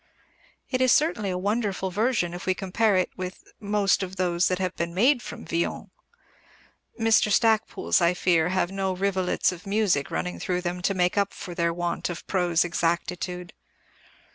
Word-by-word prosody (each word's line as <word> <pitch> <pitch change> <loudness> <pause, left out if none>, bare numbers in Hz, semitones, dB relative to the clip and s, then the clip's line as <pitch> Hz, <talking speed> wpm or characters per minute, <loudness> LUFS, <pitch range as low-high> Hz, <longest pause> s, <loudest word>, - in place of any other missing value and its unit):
It 255 -1 0
is 255 -1 +4
certainly 295 - +2
a 180 - -2
wonderful 200 -1 -1
version 210 -3 0
if 180 +2 -7
we 185 - +2
compare 200 +2 +1
it 185 - 0
with 185 0 -6 0.2
most 205 -1 +1
of 190 0 -5
those 180 -1 +1
that 185 - 0
have 185 -1 -2
been 170 0 -3
made 245 +6 +4
from 235 - -8
Villon. 170 +1 -2 1.1
Mr. 225 -1 +3
Stacpoole's, 220 -3 +2
I 170 +1 +3
fear, 175 -2 +2
have 185 -1 0
no 195 -1 -1
rivulets 190 -1 +1
of 180 +1 -10
music 195 -8 +1
running 85 +2 -3
through 180 - -1
them 180 0 -3
to 195 +2 0
make 180 +2 +2
up 200 0 -1
for 180 - -7
their 170 -1 0
want 175 +1 -2
of 175 - -6
prose 175 -3 +1
exactitude. 175 +1 -2
185 Hz, 170 wpm, -26 LUFS, 175-205 Hz, 1.1 s, is